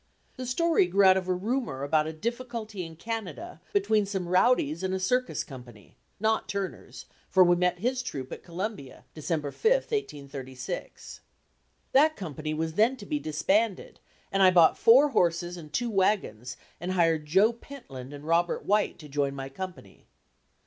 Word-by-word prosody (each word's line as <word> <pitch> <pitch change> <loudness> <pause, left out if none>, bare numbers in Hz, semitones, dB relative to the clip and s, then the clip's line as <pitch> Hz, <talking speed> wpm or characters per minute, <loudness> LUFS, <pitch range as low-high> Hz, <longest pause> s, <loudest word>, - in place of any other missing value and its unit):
The 255 -1 -6
story 325 - +2
grew 195 +2 +3
out 190 0 +7
of 185 -1 -2
a 185 - +2
rumor 195 - -2
about 155 +2 +2
a - - -3
difficulty 230 +1 -5
in 165 -1 -9
Canada 225 - -6
between 220 - +2
some 190 -3 -3
rowdies 180 - +2
and 190 0 -1
a - - -2
circus 250 +7 0
company 120 -6 -13 0.2
not 220 +1 0
Turner's, 200 -1 -5 0.2
for 190 - +6
we 175 0 +4
met 180 0 +1
his 250 +6 -1
troupe 135 - -6
at - - -7
Columbia, 175 - -6
December 155 -2 -3
5, - - -22
1836. 140 - -5 0.7
That 310 +4 +5
company 155 -4 -5
was 160 +1 -2
then 225 +8 +3
to 205 - -10
be 300 +5 -2
disbanded 195 - 0 0.3
and 195 - +1
I 190 - +8
bought 175 -3 +5
four 260 +6 +6
horses 175 -6 +1
and 155 -4 -11
two 235 +6 -1
wagons 185 - 0 0.2
and 180 +2 -3
hired 165 -4 +2
Joe 195 +9 +4
Pentland 185 - -10
and 145 0 -9
Robert 170 +2 +1
White 210 +1 +1
to 155 - -12
join 140 -1 -1
my 135 0 -6
company. 185 +6 -9
185 Hz, 165 wpm, -28 LUFS, 155-225 Hz, 0.7 s, I